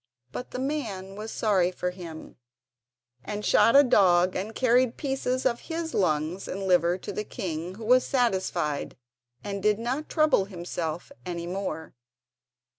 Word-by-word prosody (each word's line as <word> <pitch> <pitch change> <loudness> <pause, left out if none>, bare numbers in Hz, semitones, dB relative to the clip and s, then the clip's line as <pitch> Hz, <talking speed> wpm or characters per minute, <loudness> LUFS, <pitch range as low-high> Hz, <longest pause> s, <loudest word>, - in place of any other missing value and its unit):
But 250 - -6
the - - -6
man 225 -9 -3
was 215 +2 -6
sorry 195 -5 +2
for 180 0 -3
him, 170 -3 -9 0.9
and 210 0 -4
shot 230 - +5
a 285 - +9
dog 185 -7 +4
and 210 +4 -4
carried 250 -1 +3
pieces 265 -2 -1
of 240 -2 +2
his 325 0 -3
lungs 160 0 0
and 195 +1 -4
liver 180 -2 +3
to - - -7
the 210 - -2
king, 180 -5 -5
who 220 +1 -8
was 250 +2 +5
satisfied, 190 - 0 0.5
and 200 -1 -4
did 210 +1 +3
not 250 +7 -3
trouble 310 -11 +3
himself 175 - -5
any 170 -2 -4
more. 175 -3 -4
200 Hz, 150 wpm, -27 LUFS, 180-245 Hz, 0.9 s, a